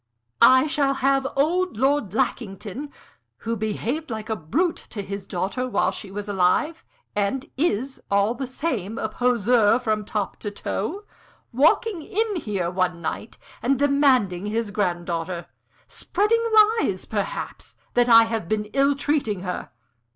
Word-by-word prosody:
I 260 +2 +7
shall 285 -3 +1
have 270 0 +2
old 340 - +1
Lord 265 -5 +1
Lackington 240 +2 -3 0.5
who 230 0 -3
behaved 230 +8 -3
like 220 -1 -5
a - - +1
brute 290 - 0
to 205 -3 -5
his 195 0 -6
daughter 195 +8 -2
while 190 -5 +1
she 195 +1 -7
was 205 +1 -6
alive, 205 - +1 0.3
and 210 +6 -1
is, 265 -3 -1
all 200 +3 +2
the 260 +2 -5
same, 240 - -3
a 220 - -1
poseur 235 -2 +3
from 215 -4 -1
top 210 -1 -3
to 210 - -4
toe 220 - -4 0.5
walking 325 - +3
in 430 +3 -1
here 195 - -2
one 180 -1 0
night 170 +7 -5 0.2
and 270 +2 +2
demanding 260 -10 +2
his 220 0 -2
granddaughter 175 -3 -2 0.4
spreading 430 +4 0 0.4
lies, - - -1
perhaps, - - -4 0.2
that 245 0 +3
I 230 -1 +9
have 225 -6 -3
been 215 -1 0
ill 275 +1 +3
treating 275 -9 -1
her. 180 -1 -4
230 Hz, 145 wpm, -24 LUFS, 200-280 Hz, 0.5 s, I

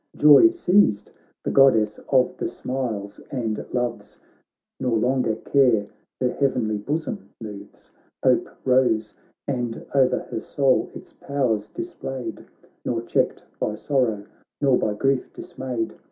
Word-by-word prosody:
Joy 150 - +8
seized 200 - +2 0.3
the - - -1
Goddess 110 -6 +4
of 130 -2 +3
the - - -2
smiles 110 -6 -4
and 115 -5 -2
loves, 120 -2 -3 0.6
Nor 120 -3 +1
longer 125 -1 +1
care 120 -8 +2 0.3
her 125 - +1
heavenly 115 -6 0
bosom 155 - -4
moves; 105 -3 -10 0.3
Hope - - +3 0.2
rose, 125 -5 +2 0.3
and 120 -4 -3
o'er 130 -2 +2
her - - -2
soul 135 +2 +1
its - - -11
powers 120 -7 -1
displayed, 135 - -6 0.4
Nor 115 -2 -2
checked - - 0 0.2
by 105 - -1
sorrow, 115 -5 0 0.3
nor 135 -3 +4
by 105 -3 0
grief 135 +3 0
dismayed. 125 -4 -5
125 Hz, 125 wpm, -23 LUFS, 110-135 Hz, 0.6 s, Joy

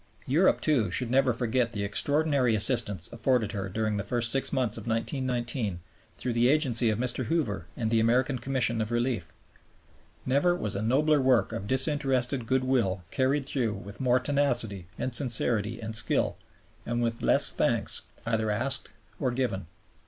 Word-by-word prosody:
Europe, 165 +8 +2
too, 130 - +1
should 115 +6 -2
never 130 0 +3
forget 120 0 -1
the 100 - -3
extraordinary 135 +4 +1
assistance 105 -6 +2
afforded 115 -1 0
her 100 -3 -4
during 110 +1 -2
the 100 - -2
first 120 +3 0
six 135 - +1
months 125 -6 0
of - - -5
1919 120 -3 -2 0.4
through 125 - -3
the 120 +2 +3
agency 130 -6 +3
of 105 - 0
Mr. 125 +1 -2
Hoover 110 - -2
and 110 -2 -2
the 115 - +3
American 125 +4 +1
Commission 120 -2 0
of 110 - -3
Relief. 120 -7 -2 0.9
Never 145 +7 +2
was 105 - -4
a 100 - -2
nobler 145 +6 +2
work 130 -3 +2
of 100 -3 -5
disinterested 130 -2 0
goodwill 125 -8 0
carried 135 +2 0
through 120 -6 -1
with 100 +2 -10
more 125 -1 +3
tenacity 120 - -1
and 130 - -3
sincerity 120 -3 +2
and 110 0 -5
skill, 110 - +3 0.5
and 120 +1 -2
with 115 0 -2
less - - +5
thanks - - 0 0.2
either 110 -1 -1
asked 130 +6 0 0.3
or 130 - 0
given. 120 -9 -3
120 Hz, 160 wpm, -27 LUFS, 110-130 Hz, 0.9 s, less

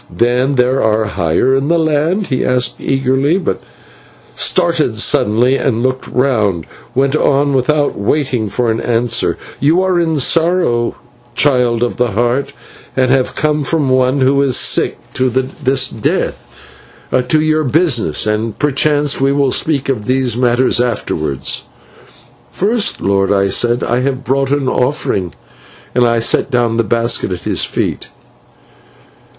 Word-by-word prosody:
"'Then 125 +8 0
there 125 +1 +2
are 110 0 +1
higher 85 +9 +1
in 135 +1 0
the 170 +1 +2
land?' 160 +5 0
he 130 -6 -1
asked 125 -1 -1
eagerly, 135 +4 +1
but 175 - -3 0.7
started 155 -10 0
suddenly, 115 +3 +2
and, 120 -4 -1
looking 130 0 -2
round, 110 - +1 0.3
went 135 +2 +1
on 145 -1 +2
without 145 +3 +1
waiting 120 0 -1
for 115 +3 0
an 110 - -2
answer, 115 0 0 0.2
'You 160 +6 +2
are 185 -2 +1
in 160 -2 0
sorrow, 160 -5 +1 0.4
Child 125 -4 +2
of 120 - -2
the 120 -3 0
Heart, 120 +6 0 0.5
and 130 -1 +2
have 130 -1 +1
come 150 -1 0
from 145 -1 0
one 130 +1 +2
who 130 +1 +3
was 140 -2 +2
sick - - +1 0.2
to 130 0 +1
the 130 +2 0 0.6
death; - - -3 0.7
to 155 - +3
your 155 0 +1
business, 135 - +1
and 110 0 -2
perchance 145 0 +1
we 135 0 +3
will 140 -1 +1
speak 145 -2 0
of 120 -6 -2
these 130 -2 +1
matters 125 0 +2
afterwards.' 80 - -2 0.8
"'First, 215 +3 0
lord,' 95 0 +1
I 100 -1 +2
said, 120 +4 +1
'I 120 - 0
have 135 0 -2
brought 135 +1 0
an 140 -1 0
offering,' 125 - -1 0.6
and 125 -1 +3
I 115 0 +1
set 115 +4 +1
down 120 -3 0
the 115 - +2
basket 115 -2 0
at 90 - -5
his - - 0
feet. - - -3
130 Hz, 145 wpm, -15 LUFS, 115-145 Hz, 0.8 s, who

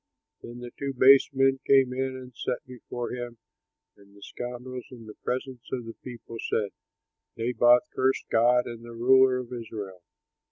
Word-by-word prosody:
Then 120 +1 -9
the 120 0 -8
two 140 -1 -2
base 135 +2 +7
men 135 0 +2
came 135 -2 +5
in 130 0 -2
and 125 -1 -11
sat 125 - -3
before 125 -1 -6
him, 120 -1 -6 0.6
and 100 0 -21
the 100 - -14
scoundrels 125 +2 -7
in 120 -3 -12
the 105 - -10
presence 130 -1 -4
of 125 -3 -3
the 115 - -7
people 120 -2 -10
said, 105 -2 0 0.7
"Naboth 120 +1 +4
cursed 130 +1 +1
God 125 +2 +4
and 115 -1 -8
the 120 0 -10
ruler 130 +2 +5
of 125 -1 -6
Israel." 105 -6 -7
125 Hz, 165 wpm, -27 LUFS, 115-130 Hz, 0.7 s, base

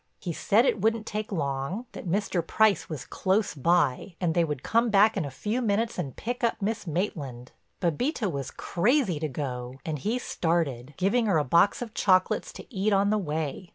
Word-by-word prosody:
He 175 - -4
said 220 - +3
it 215 - +1
wouldn't 225 +1 +1
take 215 0 -4
long, 140 - -2
that - - -8
Mr. 195 -1 0
Price 210 +2 +2
was 155 -5 -5
close 195 -3 0
by, 165 +2 +1
and 175 -3 +1
they 170 - +3
would 150 -5 -3
come 230 +1 +2
back 210 +1 +5
in 190 -6 -1
a - - -4
few 210 - -2
minutes 225 0 0
and 135 - -4
pick 245 +3 -4
up 235 - +1
Miss 215 0 -2
Maitland. 145 -8 -3 0.3
Bébita 200 - 0
was 140 -2 -4
crazy 205 - +1
to 155 - -1
go, 125 -3 -5
and 155 -2 -3
he 220 - -1
started, 155 - -1
giving 215 +5 +2
her 190 -6 +3
a 150 - +2
box 170 - +3
of 225 -3 -9
chocolates 185 -3 +2
to - - -12
eat 205 +1 +1
on 200 +1 +3
the 215 - +2
way. 160 0 -3
185 Hz, 195 wpm, -27 LUFS, 150-215 Hz, 0.3 s, back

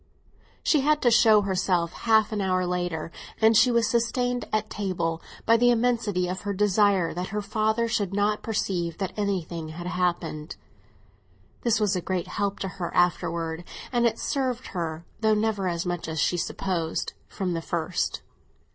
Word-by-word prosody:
She 300 - +3
had 300 +2 +3
to 240 - +5
show 225 -2 +6
herself 185 -3 0
half 220 -2 +3
an 210 -2 -1
hour 185 -1 +1
later, 175 -2 -2 0.3
and 225 0 +5
she 225 +4 +6
was 235 -2 +3
sustained 245 +1 0
at 215 0 0
table 175 -6 -2 0.2
by 230 - +5
the 245 +1 +4
immensity 230 -6 +1
of 185 +1 -4
her 205 0 -2
desire 200 -3 +3
that 180 +2 -3
her 210 0 -3
father 220 +2 +1
should 205 -4 -1
not 205 +1 +1
perceive 175 -6 -2
that 190 -2 -3
anything 180 -6 -2
had 170 +2 -7
happened. 175 -4 -2 1.1
This 235 -2 +2
was 210 -2 +2
a 180 - -1
great 185 0 -2
help 200 -1 -1
to 195 - -1
her 185 -2 -5
afterwards, 170 -2 +1 0.3
and 240 -2 +3
it 230 - -1
served 255 -3 -2
her 165 -2 -4
(though 220 -1 +3
never 210 -3 0
as 170 -1 -2
much 175 -2 -3
as 160 -1 -3
she 175 - +2
supposed) 170 -1 -2
from 185 -3 -3
the 165 - -2
first. 170 +1 -2
195 Hz, 170 wpm, -26 LUFS, 175-220 Hz, 1.1 s, show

